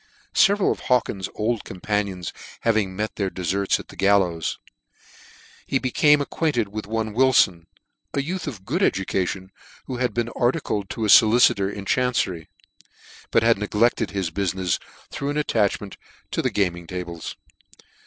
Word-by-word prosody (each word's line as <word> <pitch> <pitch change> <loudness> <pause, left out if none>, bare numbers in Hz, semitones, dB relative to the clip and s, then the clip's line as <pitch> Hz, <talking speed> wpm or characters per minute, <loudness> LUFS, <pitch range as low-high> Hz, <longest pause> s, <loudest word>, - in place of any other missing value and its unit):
Several 200 -1 +4
of - - -3
Hawkins's 115 -6 0
old 110 +1 -1
companions 95 -2 -3 0.3
having 105 -5 +1
met 105 +2 -3
their 100 -2 0
deferts 95 +2 0
at - - -11
the - - -12
gallows, 95 -5 +2 1.1
he 135 - +1
became 145 +3 +3
ac 145 - -4
quainted 125 -10 0
with 105 0 -6
one 110 -1 -2
Wilfon, 105 -9 +3 0.5
a 140 - +1
youth 175 +2 -4
of 105 -10 -7
good 170 +9 -1
edu 95 - +2
cation, 95 0 -2 0.3
who 130 - -5
had 125 -3 -1
been 120 -1 0
articled 120 -6 -1
to 110 - -3
.a - - +1
folicitor 105 -2 +6
in 100 -1 -7
chancery; 100 -9 0 0.8
but 115 - +3
had 115 -3 +4
neglected 105 +3 +1
his 95 -4 -2
bufmefs 95 -1 -1 0.3
through 140 - -3
an 145 - -2
attachment 105 -8 0 0.3
to - - 0
the - - +1
gaming 85 -4 -1
tables. 85 -2 -6
105 Hz, 155 wpm, -23 LUFS, 95-120 Hz, 1.1 s, folicitor